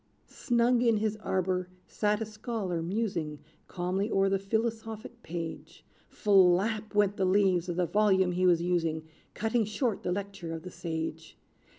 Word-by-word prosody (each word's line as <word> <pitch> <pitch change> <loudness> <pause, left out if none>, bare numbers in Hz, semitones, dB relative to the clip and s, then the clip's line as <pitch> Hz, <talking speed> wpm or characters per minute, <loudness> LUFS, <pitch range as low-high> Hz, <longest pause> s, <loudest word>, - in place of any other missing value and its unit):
Snug 240 -1 +1
in 230 -3 +3
his 215 0 0
arbor 185 -3 -1 0.2
sat 210 0 0
a - - 0
scholar, 215 -5 -3
musing 170 -5 -2 0.3
Calmly 185 +3 -2
o'er 195 -2 +2
the 195 0 +1
philosophic 225 +2 -3
page: 165 -3 -7 0.2
"Flap!" 205 +2 +3
went 205 -1 +3
the 195 - +1
leaves 185 -2 +3
of 175 - -2
the 180 0 +1
volume 190 -1 +3
he 185 +1 +2
was 170 -1 +4
using, 165 -3 0 0.3
Cutting 225 +1 +1
short 215 +1 -1
the - - -2
lecture 195 -3 -4
of 160 - -8
the 180 - -8
sage. 160 -2 -5
195 Hz, 155 wpm, -29 LUFS, 175-215 Hz, 0.3 s, was